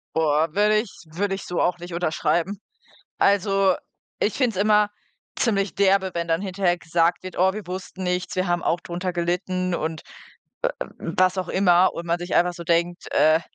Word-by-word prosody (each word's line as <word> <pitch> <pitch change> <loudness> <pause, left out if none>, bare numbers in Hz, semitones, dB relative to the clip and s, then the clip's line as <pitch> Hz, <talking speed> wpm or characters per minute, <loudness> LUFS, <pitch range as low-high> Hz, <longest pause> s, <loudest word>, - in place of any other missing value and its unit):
Boah, 155 0 +2
würde 210 +1 +4
ich 215 -2 -3 0.2
würde 195 +4 -1
ich 195 - -6
so 175 - -2
auch 175 0 +1
nicht 175 +1 -9
unterschreiben. 175 +3 0 0.6
Also, 195 -1 +3 0.4
ich 210 - +1
finde 245 -7 0
es - - +2
immer 210 0 +4 0.5
ziemlich 200 -4 0
derbe, 195 -1 +3
wenn 170 0 -2
dann 165 +2 +1
hinterher 190 -2 0
gesagt 170 +1 +1
wird: 185 - -8
„Oh, 190 +1 +3
wir 215 -1 -6
wussten 185 0 -6
nichts, 180 0 -2
wir 185 +1 0
haben 175 -1 0
auch 170 +1 0
drunter 180 +1 -4
gelitten“ 180 +1 -1
und 160 -2 -3 0.8
w - - -3 0.2
w - - -2
was 185 +1 +3
auch 185 - -2
immer 185 -1 +4
und 170 - -5
man 170 +1 0
sich 175 0 -4
einfach 175 0 +3
so 170 -1 -9
denkt, 170 +1 0
äh: 155 +1 +5
180 Hz, 190 wpm, -23 LUFS, 170-195 Hz, 0.8 s, äh